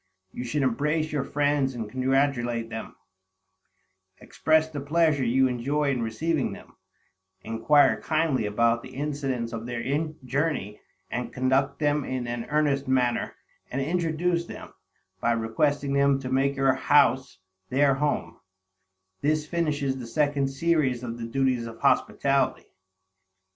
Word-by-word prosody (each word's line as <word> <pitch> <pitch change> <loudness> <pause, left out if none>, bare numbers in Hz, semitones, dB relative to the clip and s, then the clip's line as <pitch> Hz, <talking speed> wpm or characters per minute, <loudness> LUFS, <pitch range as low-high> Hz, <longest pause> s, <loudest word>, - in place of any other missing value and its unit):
You 125 - -6
should 135 +4 -1
embrace 150 +5 0
your 145 -2 -1
friends 145 -2 0
and 115 -3 -4
congratulate 130 -2 0
them; 110 0 -6 1.2
express 160 0 +1
the 150 -3 -6
pleasure 155 -1 +2
you 130 +2 +3
enjoy 140 +4 0
in 125 -3 -1
receiving 140 +7 -1
them, - - -13 0.7
inquire 115 +6 +3
kindly 155 -8 0
about 115 +2 +2
the 130 - -12
incidents 135 -5 -3
of 115 +1 -5
their 120 -1 -4 0.4
journey, 130 -6 -2 0.3
and 125 0 -3
conduct 130 +2 +1
them 145 -1 +1
in 130 -2 -3
an 120 0 -4
earnest 145 -1 0
manner, 125 -2 +1 0.3
and 130 - -3
introduce 170 +3 0
them, - - -10 0.5
by 120 - +2
requesting 140 +5 0
them 140 0 +3
to 130 -1 -5
make 135 +1 +2
your 135 -1 +3
house 130 -1 +3 0.3
their 135 +1 +3
home; 145 +2 -2 0.8
this 155 +1 +1
finishes 150 -5 -1
the 120 - -7
second 145 +1 +1
series 135 -3 0
of 120 -1 -5
the 115 - -4
duties 125 -1 0
of 115 0 -10
hospitality. - - +1
135 Hz, 135 wpm, -26 LUFS, 120-150 Hz, 1.2 s, you